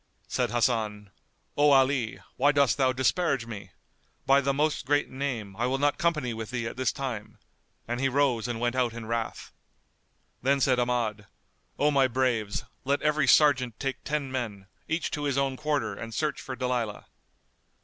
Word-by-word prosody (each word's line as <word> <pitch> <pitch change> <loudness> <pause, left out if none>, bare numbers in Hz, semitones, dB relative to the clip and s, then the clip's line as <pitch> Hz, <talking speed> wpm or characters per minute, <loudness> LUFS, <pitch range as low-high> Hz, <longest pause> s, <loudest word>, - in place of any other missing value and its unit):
Said - - 0
Hasan, 110 -4 0 0.4
"O 145 0 +5
Ali, 135 -4 +3 0.2
why 145 +3 +4
dost 140 -3 +3
thou 130 -1 +4
disparage 130 0 +1
me? 105 -5 -8 0.6
By 135 +1 +5
the 140 0 +1
Most 150 +2 0
Great 145 +1 +1
Name, 125 -8 -4
I 120 +4 0
will 130 +1 0
not 145 +5 +1
company 155 -9 0
with 110 -1 -6
thee 120 -2 -3
at 115 - -4
this 130 0 +1
time!"; 125 -6 -5 0.5
and 120 +1 -2
he 135 0 +2
rose 130 -4 +1
and 120 -2 -3
went 120 +1 0
out 125 -3 +1
in 115 -1 -7
wrath. 115 0 -3 0.9
Then 140 +2 +2
said 130 -2 +3
Ahmad, 115 -4 -1 0.5
"O 150 +1 +3
my 135 -2 +4
braves, 120 -4 0 0.2
let 140 +1 0
every 150 -2 +2
sergeant 130 -6 +4
take 135 -1 -3
ten 145 -3 -2
men, 110 -7 -4 0.2
each 160 +1 -1
to 150 -3 -3
his 140 -2 0
own 135 -1 +1
quarter 150 +1 -1
and 115 0 -7
search 155 -1 -1
for 130 - -6
Dalilah." 125 -4 -2
130 Hz, 175 wpm, -28 LUFS, 115-140 Hz, 0.9 s, O